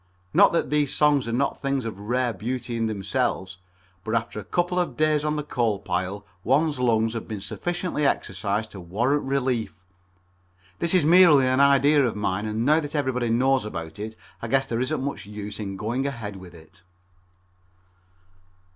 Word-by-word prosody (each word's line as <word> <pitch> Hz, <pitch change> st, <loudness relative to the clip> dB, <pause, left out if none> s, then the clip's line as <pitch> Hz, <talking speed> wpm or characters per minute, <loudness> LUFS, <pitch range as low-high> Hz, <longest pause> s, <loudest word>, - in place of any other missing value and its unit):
Not -, -, +6 dB
that -, -, 0 dB
these 150 Hz, -2 st, +2 dB
songs 145 Hz, -4 st, +2 dB
are -, -, -2 dB
not 135 Hz, +4 st, -1 dB
things 135 Hz, -3 st, -1 dB
of 110 Hz, -4 st, -5 dB
rare 120 Hz, +3 st, -1 dB
beauty 120 Hz, +4 st, -4 dB
in 115 Hz, -1 st, 0 dB
themselves, 95 Hz, -2 st, -2 dB, 0.5 s
but 110 Hz, +3 st, -2 dB
after 115 Hz, -1 st, -2 dB
a 175 Hz, -, 0 dB
day 155 Hz, -1 st, +1 dB
on 150 Hz, 0 st, -1 dB
the 150 Hz, -, -2 dB
coal 120 Hz, -7 st, 0 dB
pile 95 Hz, +1 st, -3 dB, 0.2 s
one's 145 Hz, +3 st, +2 dB
lungs 115 Hz, -2 st, +2 dB
have 115 Hz, -, -5 dB
been 110 Hz, -3 st, -5 dB
sufficiently 175 Hz, -, -3 dB
exercised 100 Hz, 0 st, -2 dB
to 100 Hz, -, -9 dB
warrant 120 Hz, +12 st, 0 dB
relief. 130 Hz, -4 st, -1 dB, 1.0 s
This 170 Hz, +2 st, +1 dB
is 175 Hz, -5 st, +4 dB
merely 165 Hz, -5 st, +7 dB
an 130 Hz, +1 st, +2 dB
idea 140 Hz, +1 st, +5 dB
of 120 Hz, -, 0 dB
mine, 105 Hz, 0 st, -1 dB
and 110 Hz, +2 st, -2 dB
now 155 Hz, +3 st, +5 dB
that 150 Hz, -1 st, -6 dB
everybody 130 Hz, -4 st, 0 dB
knows 130 Hz, +2 st, +2 dB
about 85 Hz, -3 st, -7 dB
it 110 Hz, +1 st, -5 dB, 0.3 s
I 115 Hz, -, -4 dB
guess 135 Hz, +3 st, +2 dB
there 115 Hz, 0 st, -2 dB
isn't 130 Hz, +1 st, -1 dB
much 140 Hz, -6 st, -4 dB
use 105 Hz, 0 st, -7 dB
in 100 Hz, -2 st, -5 dB
going 120 Hz, +7 st, -2 dB
ahead 115 Hz, -7 st, -5 dB
with 90 Hz, -2 st, -12 dB
it. 80 Hz, +3 st, -17 dB
120 Hz, 175 wpm, -25 LUFS, 105-140 Hz, 1.0 s, merely